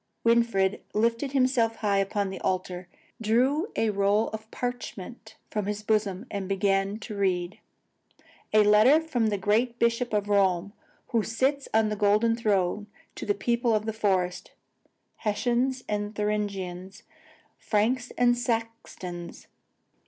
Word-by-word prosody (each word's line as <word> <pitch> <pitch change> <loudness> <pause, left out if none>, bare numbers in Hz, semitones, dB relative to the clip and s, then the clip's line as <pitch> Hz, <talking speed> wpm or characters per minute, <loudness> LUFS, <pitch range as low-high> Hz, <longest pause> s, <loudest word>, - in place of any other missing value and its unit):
Winfried 230 -5 +2
lifted 230 +5 +1
himself 255 -4 +2
high 205 -3 +1
upon 195 0 -1
the 190 - -6
altar, 185 -1 -2 0.3
drew 260 - +1
a 225 -1 +1
roll 200 +2 +2
of 220 0 -8
parchment 235 -2 -6 0.2
from 210 -2 -2
his 210 0 -3
bosom, 210 -1 0
and 200 -2 -4
began 195 +1 +1
to 220 -1 -8
read. 185 -2 -1 0.9
"A 215 0 +6
letter 215 +8 +6
from 260 -9 -1
the 210 -1 0
great 225 +5 +1
Bishop 235 +1 +1
of 205 -1 0
Rome, 200 -1 +2 0.4
who 230 - +2
sits 265 +6 0
on 220 -1 +2
a - - -1
golden 210 +3 +3
throne, 205 -3 0 0.3
to - - -7
the 205 - +2
people 235 +2 +1
of 215 0 -1
the 220 - -2
forest, 185 -4 -1 0.6
Hessians 245 +4 0
and 205 0 -3
Thuringians, 200 -3 -3 0.6
Franks 235 +4 0
and 245 0 +4
Saxons. 225 -7 -4
210 Hz, 135 wpm, -27 LUFS, 200-235 Hz, 0.9 s, A